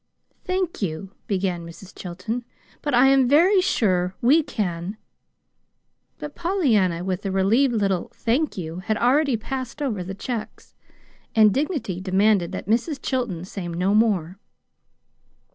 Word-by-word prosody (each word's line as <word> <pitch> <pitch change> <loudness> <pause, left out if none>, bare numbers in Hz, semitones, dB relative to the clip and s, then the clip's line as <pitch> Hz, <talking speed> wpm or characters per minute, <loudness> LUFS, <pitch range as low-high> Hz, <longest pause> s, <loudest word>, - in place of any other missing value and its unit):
"Thank 370 -5 -2
you," 185 +1 -3 0.2
began 185 -3 -1
Mrs. 170 +3 -12
Chilton, 185 +7 -5 0.4
"but 290 -4 0
I 245 +2 +6
am 270 -2 +4
very 365 +7 +5
sure 185 - +1
we 280 +7 +5
can 195 - -3 0.6
" - - -50
But 295 -1 -7
Pollyanna, 225 - +1
with 185 +1 -3
a 195 - -2
relieved 225 +7 +2
little 195 -4 0
"thank 260 +5 0
you!" 165 -1 -5
had 215 +3 -1
already 265 +1 +3
passed 260 +4 -5
over 235 -11 -2
the 190 +2 -6
checks; 230 +2 -6 0.6
and 215 -2 +6
dignity 275 - -2
demanded 190 -1 +2
that - - -5
Mrs. 245 - 0
Chilton 235 -10 -2
say 185 -2 -6
no 180 +4 0
more. 195 -5 +1
215 Hz, 140 wpm, -23 LUFS, 185-265 Hz, 0.6 s, I